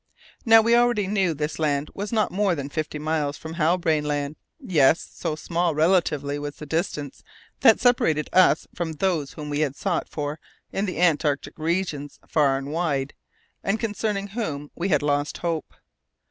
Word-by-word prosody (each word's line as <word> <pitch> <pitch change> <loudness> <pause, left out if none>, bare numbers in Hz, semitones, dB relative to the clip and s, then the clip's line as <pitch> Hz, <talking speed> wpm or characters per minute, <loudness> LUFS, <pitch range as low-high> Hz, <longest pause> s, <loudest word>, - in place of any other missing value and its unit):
Now, 225 0 +8
we 230 +1 +3
already 240 -4 +3
knew 190 -4 +1
this 150 +2 -3
land 145 -1 0
was 205 +1 -5
not 220 -2 +1
more 195 -1 +1
than 140 -2 -5
fifty 155 +1 -3
miles 150 -1 -1
from 160 0 -8
Halbrane 165 -2 +1
Land. 145 0 -2 0.2
Yes! 165 - +3
so 160 -3 -3
small, 170 +1 -1
relatively, 150 -4 +1
was 145 0 -5
the 150 - -9
distance 150 -3 -3 0.4
that 225 - +6
separated 160 - +2
us 180 -5 +4
from 170 -2 -3
those 160 -4 -1
whom 150 -2 -7
we 145 - -1
had 145 -3 0
sought 180 0 -2
for 150 +1 -4 0.3
in 200 +1 -1
the 185 - -4
antarctic 150 -5 +1
regions 160 -3 -2
far 140 -3 +2
and 140 +1 -5
wide, 145 -5 -1 0.5
and 210 +3 0
concerning 205 -2 -2
whom 155 -10 -4
we 180 +3 -2
had 150 -4 +2
lost 145 0 0
hope. 165 -2 -3
160 Hz, 170 wpm, -24 LUFS, 145-190 Hz, 0.5 s, Now